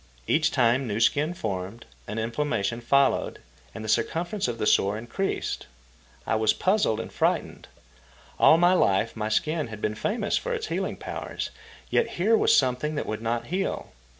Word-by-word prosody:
Each 155 Hz, -, +2 dB
time 125 Hz, -1 st, +2 dB
new 105 Hz, 0 st, -2 dB
skin 150 Hz, +8 st, +2 dB
formed, 100 Hz, -, -5 dB, 0.2 s
an 105 Hz, -, -5 dB
inflammation 115 Hz, -1 st, -1 dB
followed, 140 Hz, +3 st, +2 dB, 0.4 s
and 110 Hz, -, -6 dB
the -, -, -5 dB
circumference 175 Hz, -, 0 dB
of 120 Hz, -1 st, -3 dB
the 110 Hz, -, -2 dB
sore 100 Hz, 0 st, +3 dB
increased. 120 Hz, -, -3 dB, 0.6 s
I -, -, 0 dB
was 110 Hz, -1 st, +3 dB
puzzled 190 Hz, -, +1 dB
and 115 Hz, -, -6 dB
frightened. -, -, -1 dB, 0.7 s
All 160 Hz, -, +7 dB
my 175 Hz, +2 st, +5 dB
life 110 Hz, -, +2 dB
my 110 Hz, -1 st, -2 dB
skin 155 Hz, +6 st, 0 dB
had 110 Hz, -2 st, -8 dB
been 105 Hz, -, -1 dB
famous 210 Hz, -, -1 dB
for -, -, -2 dB
its 440 Hz, -1 st, -4 dB
healing -, -, -2 dB
powers, -, -, -5 dB, 0.4 s
yet 475 Hz, -, +2 dB
here 210 Hz, +6 st, +4 dB
was -, -, +4 dB
something 130 Hz, +4 st, +1 dB
that 145 Hz, -, -2 dB
would 110 Hz, 0 st, -4 dB
not 115 Hz, +1 st, -1 dB
heal. 190 Hz, +1 st, -2 dB
120 Hz, 170 wpm, -26 LUFS, 110-170 Hz, 0.7 s, All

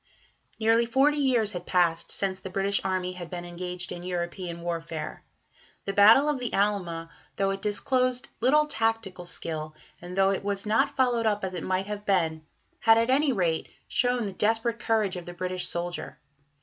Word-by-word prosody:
Nearly 225 Hz, +1 st, +3 dB
forty 280 Hz, +5 st, +3 dB
years 245 Hz, -7 st, +2 dB
had 180 Hz, -2 st, -7 dB
passed 175 Hz, -3 st, +1 dB
since 190 Hz, -1 st, 0 dB
the 190 Hz, -, -7 dB
British 195 Hz, +1 st, 0 dB
army 185 Hz, -1 st, -1 dB
had 175 Hz, -2 st, -8 dB
been 175 Hz, -1 st, -6 dB
engaged 180 Hz, +1 st, -5 dB
in 175 Hz, -, -6 dB
European 175 Hz, -1 st, -4 dB
warfare. 165 Hz, -2 st, -5 dB, 0.6 s
The 195 Hz, -, -2 dB
Battle 220 Hz, +8 st, +7 dB
of 295 Hz, -3 st, 0 dB
the 245 Hz, -1 st, -3 dB
Alma, 180 Hz, -5 st, -1 dB, 0.2 s
though 195 Hz, 0 st, +1 dB
it 195 Hz, 0 st, -4 dB
disclosed 255 Hz, +4 st, 0 dB
little 295 Hz, +6 st, +4 dB
tactical 225 Hz, -9 st, -1 dB
skill, 155 Hz, -3 st, -4 dB, 0.3 s
and 180 Hz, +2 st, -8 dB
though 195 Hz, 0 st, +4 dB
it 195 Hz, -, -2 dB
was 200 Hz, 0 st, -2 dB
not 215 Hz, +1 st, +2 dB
followed 245 Hz, -3 st, +2 dB
up 210 Hz, -1 st, 0 dB
as 190 Hz, -1 st, -3 dB
it 175 Hz, -, -4 dB
might 190 Hz, +1 st, -1 dB
have 205 Hz, 0 st, -5 dB
been, 165 Hz, -6 st, +1 dB, 0.4 s
had 225 Hz, 0 st, +5 dB
at 230 Hz, +2 st, +2 dB
any 285 Hz, +2 st, +3 dB
rate 175 Hz, -8 st, 0 dB, 0.2 s
shown 245 Hz, -2 st, +1 dB
the 200 Hz, -, -4 dB
desperate 225 Hz, +3 st, +1 dB
courage 215 Hz, -5 st, 0 dB
of 175 Hz, -, -8 dB
the 175 Hz, -, -7 dB
British 185 Hz, 0 st, -1 dB
soldier. 175 Hz, 0 st, -3 dB
195 Hz, 180 wpm, -27 LUFS, 175-225 Hz, 0.6 s, Battle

